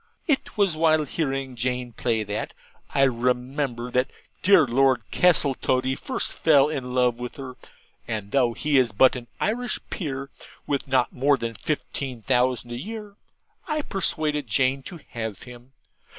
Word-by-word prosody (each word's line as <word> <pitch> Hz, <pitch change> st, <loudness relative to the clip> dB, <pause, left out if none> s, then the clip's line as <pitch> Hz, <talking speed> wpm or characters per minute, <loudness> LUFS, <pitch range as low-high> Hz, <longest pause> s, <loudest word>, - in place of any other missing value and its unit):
It 290 Hz, -7 st, -1 dB
was 195 Hz, -5 st, +3 dB
while 155 Hz, -1 st, +3 dB
hearing 135 Hz, -3 st, -2 dB
Jane 125 Hz, 0 st, -2 dB
play 110 Hz, -1 st, 0 dB
that, 105 Hz, 0 st, -4 dB, 0.3 s
I 135 Hz, -, +2 dB
remember, 125 Hz, 0 st, 0 dB
that 125 Hz, +1 st, +1 dB, 0.3 s
dear 185 Hz, -5 st, +6 dB
Lord 130 Hz, -1 st, +3 dB
Castletoddy 130 Hz, -6 st, +3 dB
first 260 Hz, -, -2 dB
fell 145 Hz, -3 st, +4 dB
in 130 Hz, -4 st, -4 dB
love 125 Hz, -2 st, +2 dB
with 125 Hz, 0 st, -6 dB
her; 135 Hz, -2 st, -7 dB, 0.5 s
and 105 Hz, -3 st, -4 dB
though 125 Hz, -4 st, +3 dB
he 145 Hz, +2 st, +2 dB
is 120 Hz, -5 st, +1 dB
but 130 Hz, +7 st, +5 dB
an 120 Hz, -2 st, -7 dB
Irish 240 Hz, +2 st, -1 dB
Peer, 140 Hz, -5 st, -4 dB, 0.3 s
with 140 Hz, -1 st, -1 dB
not 130 Hz, -2 st, +2 dB
more 140 Hz, +2 st, +3 dB
than 115 Hz, -1 st, -4 dB
fifteen 130 Hz, 0 st, -4 dB
thousand 125 Hz, +1 st, +1 dB
a 120 Hz, -, -4 dB
year, 210 Hz, -, -7 dB, 0.5 s
I 305 Hz, -2 st, -1 dB
persuaded 155 Hz, -, -1 dB
Jane 130 Hz, +5 st, +2 dB
to 170 Hz, -4 st, -10 dB
have 110 Hz, -4 st, -5 dB
him. 125 Hz, +1 st, -13 dB
130 Hz, 150 wpm, -25 LUFS, 125-150 Hz, 0.5 s, dear